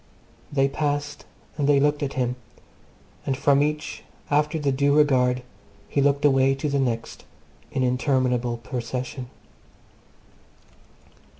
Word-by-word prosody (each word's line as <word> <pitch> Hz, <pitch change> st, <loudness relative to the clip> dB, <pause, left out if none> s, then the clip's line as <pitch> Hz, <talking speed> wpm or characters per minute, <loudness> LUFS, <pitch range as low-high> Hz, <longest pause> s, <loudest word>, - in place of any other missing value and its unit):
They 135 Hz, -1 st, +3 dB
passed 145 Hz, 0 st, -2 dB, 0.3 s
and 145 Hz, 0 st, +2 dB
they 140 Hz, -1 st, +5 dB
looked 145 Hz, +1 st, +2 dB
at 140 Hz, -1 st, -2 dB
him; 125 Hz, -1 st, -1 dB, 0.9 s
and 135 Hz, -2 st, -1 dB
from 140 Hz, 0 st, +3 dB
each, 150 Hz, +1 st, -2 dB, 0.3 s
after 150 Hz, +2 st, +2 dB
the 145 Hz, -3 st, 0 dB
due 140 Hz, +2 st, +2 dB
regard, 125 Hz, -4 st, +3 dB, 0.4 s
he 140 Hz, -, 0 dB
looked 145 Hz, +1 st, +2 dB
away 135 Hz, -1 st, +4 dB
to 135 Hz, +2 st, -3 dB
the 140 Hz, 0 st, 0 dB
next 120 Hz, -4 st, -2 dB, 0.5 s
in 130 Hz, -, -1 dB
interminable 125 Hz, -2 st, +1 dB
procession. 125 Hz, +2 st, -5 dB
135 Hz, 120 wpm, -24 LUFS, 125-145 Hz, 0.9 s, they